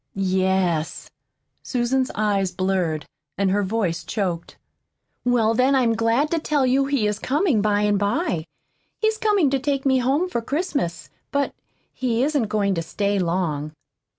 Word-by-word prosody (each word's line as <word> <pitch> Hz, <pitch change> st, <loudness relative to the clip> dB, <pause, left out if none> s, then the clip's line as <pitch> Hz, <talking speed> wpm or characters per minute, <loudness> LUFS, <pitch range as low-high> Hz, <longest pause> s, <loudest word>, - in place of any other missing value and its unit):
"Yes." 185 Hz, -4 st, 0 dB, 0.5 s
Susan's 255 Hz, +1 st, 0 dB
eyes 200 Hz, -3 st, +1 dB
blurred, 180 Hz, -4 st, -1 dB, 0.3 s
and 195 Hz, -1 st, +1 dB
her 205 Hz, +1 st, +2 dB
voice 195 Hz, -4 st, -1 dB
choked. 180 Hz, -6 st, -3 dB, 0.7 s
"Well, 235 Hz, -3 st, +3 dB
then 255 Hz, +4 st, +3 dB
I'm 245 Hz, -4 st, +3 dB
glad 230 Hz, +6 st, +1 dB
to 335 Hz, -, +1 dB
tell 295 Hz, -3 st, +1 dB
you 265 Hz, +2 st, +3 dB
he 275 Hz, -5 st, 0 dB
is 210 Hz, 0 st, -1 dB
coming 285 Hz, -, +1 dB
by 205 Hz, 0 st, +2 dB
and 205 Hz, -1 st, +2 dB
by. 205 Hz, -, 0 dB, 0.5 s
He's 440 Hz, 0 st, 0 dB
coming 405 Hz, -10 st, +3 dB
to 275 Hz, -, +1 dB
take 275 Hz, 0 st, -1 dB
me 265 Hz, -1 st, +4 dB
home 275 Hz, +8 st, +1 dB
for 235 Hz, -10 st, -2 dB
Christmas. 280 Hz, -, -2 dB, 0.2 s
But 280 Hz, 0 st, 0 dB, 0.4 s
he 245 Hz, -1 st, 0 dB
isn't 285 Hz, -5 st, +1 dB
going 200 Hz, -2 st, +1 dB
to 165 Hz, -, -1 dB
stay 200 Hz, +4 st, -1 dB
long." 165 Hz, -4 st, -1 dB
225 Hz, 150 wpm, -23 LUFS, 190-275 Hz, 0.7 s, me